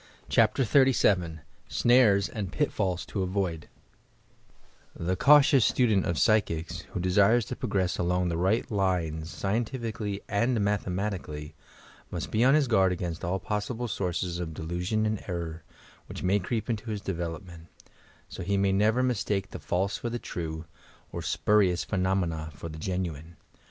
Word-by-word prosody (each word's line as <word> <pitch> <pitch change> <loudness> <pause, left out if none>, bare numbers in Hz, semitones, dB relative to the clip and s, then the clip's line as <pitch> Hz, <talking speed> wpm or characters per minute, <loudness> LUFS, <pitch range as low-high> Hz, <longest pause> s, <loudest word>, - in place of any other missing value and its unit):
CHAPTER 115 +4 +3
XXXVII 100 - +3 0.3
SNARES 110 -5 +4
AND 100 -4 -5
PITFALLS 95 - -1
TO 100 - -3
AVOID 90 -4 -2 1.3
The 90 +2 -1
cautious 140 +2 +6
student 110 -7 +2
of 85 - -1
psychics, 95 -7 +1
who - - -3
desires 100 +6 +3
to - - -5
prog - - -5
ress 95 -2 +1
along 90 +1 +1
the 85 - -1
right 100 +8 +1
lines 85 -6 -1
scientificallj' 110 - -3
and 115 +5 +1
mathema 100 0 0
tically, 75 -5 -7 0.6
must - - -5
be 110 - +2
on 135 +3 +6
hia 150 -2 +4
guard 95 -6 +3
against 85 -2 -4
all 90 +2 0
possible 105 +5 -3
sources 90 -3 -2
of 80 -3 -5
delusion 90 +7 -2
and 110 -1 -2
error, 85 -3 -4 0.5
which - - -7
may 95 +3 +3
creep 110 +4 -3
into 115 -1 -3
his 105 -2 -3
de 95 - -3
velopment, 85 0 -6 0.6
so - - -8
that 85 - -6
he 100 0 +1
may 100 0 +2
never 110 +6 +2
mistake 105 -6 -1
the - - -7
false 95 +2 -1
for 120 - -4
the 120 - -3
true, 80 -7 -5 0.5
or - - -5
spurious 95 -5 +2
phenomena 90 -5 -1
for 85 +3 -7
the 80 0 -8
genuine. 85 -3 -4
95 Hz, 155 wpm, -28 LUFS, 85-110 Hz, 1.3 s, cautious